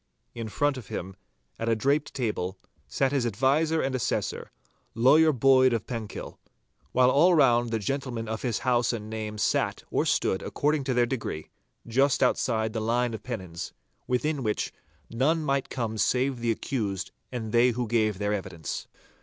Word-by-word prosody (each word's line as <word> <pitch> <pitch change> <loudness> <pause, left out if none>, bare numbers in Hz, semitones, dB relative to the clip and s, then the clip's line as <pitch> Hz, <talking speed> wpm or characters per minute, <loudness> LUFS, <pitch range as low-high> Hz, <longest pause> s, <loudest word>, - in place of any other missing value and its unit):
In 115 -2 -5
front 145 +6 +1
of 120 -6 -9
him, 95 +1 -5 0.4
at 115 - -1
a 115 - +3
draped 140 +6 0
table, 105 -7 -2 0.3
sat 135 -1 +1
his 140 -3 +1
adviser 135 +8 +2
and 135 0 -1
assessor, 130 -4 -2 0.5
Lawyer 150 +7 +6
Boyd 130 -1 +5
of 115 -3 -1
Penkill, 115 -4 -6 0.5
while 125 0 +4
all 170 +6 +5
round 120 -5 +4
the 115 - 0
gentlemen 120 0 -3
of 110 0 -3
his 120 -4 -1
house 120 -1 +2
and 110 -1 -5
name 110 -1 -4
sat 105 - 0
or - - +1
stood 95 - +1
according 150 -1 0
to 130 -2 0
their 120 0 +4
degree, 115 - -4 0.3
just 135 +4 +2
outside 110 -2 +1
the 110 - -2
line 120 +2 +1
of 110 - -5
pennons, 95 -9 -6 0.3
within 140 +3 0
which 110 -3 -1 0.4
none 150 +8 +1
might 140 -2 0
come 110 -3 -3
save 125 +6 +1
the 120 0 -1
accused 105 -5 -2 0.2
and 115 -4 -4
they 120 +2 +5
who 120 0 -2
gave 110 -3 +1
their 105 +1 -1
evidence. 85 -6 -5
120 Hz, 170 wpm, -27 LUFS, 110-135 Hz, 0.5 s, Lawyer